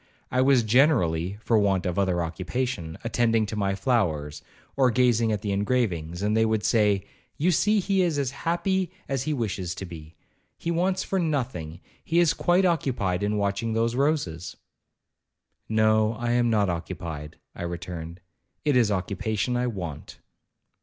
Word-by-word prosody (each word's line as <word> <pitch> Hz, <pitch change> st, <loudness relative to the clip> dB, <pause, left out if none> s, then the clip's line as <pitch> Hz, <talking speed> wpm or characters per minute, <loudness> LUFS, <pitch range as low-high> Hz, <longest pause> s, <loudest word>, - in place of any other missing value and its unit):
I 130 Hz, -, +2 dB
was 130 Hz, -2 st, +4 dB
generally 105 Hz, -, +2 dB
(for 110 Hz, 0 st, +2 dB
want 95 Hz, -3 st, +1 dB
of 90 Hz, +1 st, -1 dB
other 90 Hz, -3 st, +1 dB
occupation) 90 Hz, +1 st, -3 dB
attending 115 Hz, -2 st, +2 dB
to 105 Hz, -, -5 dB
my 100 Hz, -2 st, 0 dB
flowers, 90 Hz, -, 0 dB, 0.3 s
or 130 Hz, -2 st, +4 dB
gazing 120 Hz, -2 st, +3 dB
at 105 Hz, -2 st, -2 dB
the 100 Hz, -, -1 dB
engravings,—and 100 Hz, -3 st, 0 dB
they 110 Hz, -, +4 dB
would 110 Hz, -1 st, +1 dB
say, 105 Hz, -3 st, +2 dB, 0.3 s
'You 175 Hz, +5 st, +2 dB
see 210 Hz, +6 st, +3 dB
he 195 Hz, 0 st, +1 dB
is 170 Hz, -5 st, +1 dB
as 135 Hz, -3 st, 0 dB
happy 175 Hz, +4 st, -1 dB, 0.2 s
as 135 Hz, -2 st, -1 dB
he 150 Hz, +3 st, -1 dB
wishes 95 Hz, -7 st, -3 dB
to 95 Hz, -, -6 dB
be—he 85 Hz, -, -9 dB
wants 185 Hz, +2 st, +1 dB
for 190 Hz, -, -1 dB
nothing—he 130 Hz, -, -3 dB
is 170 Hz, -2 st, +4 dB
quite 180 Hz, +3 st, +2 dB
occupied 120 Hz, -, 0 dB
in 105 Hz, +1 st, 0 dB
watching 100 Hz, +3 st, -1 dB
those 115 Hz, +1 st, +1 dB
roses.' 125 Hz, -, -1 dB, 1.1 s
'No, 110 Hz, 0 st, +3 dB
I 120 Hz, +1 st, -2 dB
am 120 Hz, 0 st, +2 dB
not 105 Hz, -3 st, +2 dB
occupied,' 85 Hz, -3 st, -5 dB, 0.2 s
I -, -, -9 dB
returned, 85 Hz, 0 st, -6 dB, 0.4 s
'it 145 Hz, -3 st, +3 dB
is 120 Hz, -4 st, +4 dB
occupation 100 Hz, +4 st, -1 dB
I 125 Hz, 0 st, 0 dB
want.' 85 Hz, -10 st, -6 dB
110 Hz, 155 wpm, -26 LUFS, 90-130 Hz, 1.1 s, was